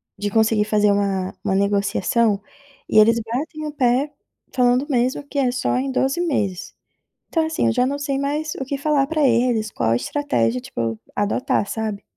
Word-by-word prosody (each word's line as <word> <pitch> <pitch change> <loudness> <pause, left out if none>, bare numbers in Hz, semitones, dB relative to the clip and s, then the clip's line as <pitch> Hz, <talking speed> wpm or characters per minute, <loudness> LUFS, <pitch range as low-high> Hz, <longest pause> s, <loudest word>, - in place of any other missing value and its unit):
de 205 +1 -3
conseguir 220 0 +2
fazer 210 -1 +3
uma 195 -2 -1
uma 190 - 0
negociação, 200 +2 +1 0.5
e 215 - +4
eles 230 +2 +5
batem 305 +6 -4
o 300 - -4
pé, 260 +2 +1 0.4
falando 250 +2 +3
mesmo 255 +2 0
que 285 - -3
é 250 -2 +2
só 250 0 -1
em 265 +1 -1
12 270 +6 0
meses, 200 - -2 0.5
então 325 -2 +1
assim, 315 - 0
eu 115 - +3
já 250 - +2
não 280 +2 -1
sei 280 -1 -2
mais 295 +2 -2
o 265 - -4
que 275 +1 -4
falar 285 -1 +2
pra 305 -2 +1
eles, 230 -2 +1
qual 115 0 0
estratégia 125 - 0
tipo 115 -1 -3 0.2
adotar, 205 0 0
sabe? 215 -3 -3
240 Hz, 180 wpm, -21 LUFS, 205-280 Hz, 0.5 s, eles